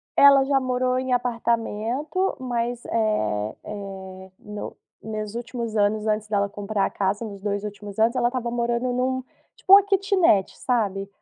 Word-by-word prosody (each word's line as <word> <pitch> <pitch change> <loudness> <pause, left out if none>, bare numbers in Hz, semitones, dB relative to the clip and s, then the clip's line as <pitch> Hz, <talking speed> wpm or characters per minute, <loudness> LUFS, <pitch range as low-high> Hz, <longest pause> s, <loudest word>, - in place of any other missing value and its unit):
Ela 280 -1 +7
já 275 -1 +3
morou 255 0 0
em 260 -1 -1
apartamento, 240 - -1
mas, 240 -1 -2
eh 110 - 0
eh, 190 -2 -8
no 210 0 -7 0.3
nos 215 0 -5
últimos 235 -2 -4
anos 210 +1 +1
antes 215 0 0
dela 200 -1 0
comprar 205 0 -1
a - - -6
casa, 200 +3 -1
nos 200 -3 -7
2 205 0 -2
últimos 205 0 -7
anos, 230 +3 +3
ela 240 -1 +2
estava 245 -2 -3
morando 235 +1 -1
em 250 0 -1
um, 260 0 0 0.3
tipo, 375 - -3
uma 400 0 +10
quitinete 385 - +2
sabe, 200 -6 -1
230 Hz, 160 wpm, -24 LUFS, 205-250 Hz, 0.3 s, uma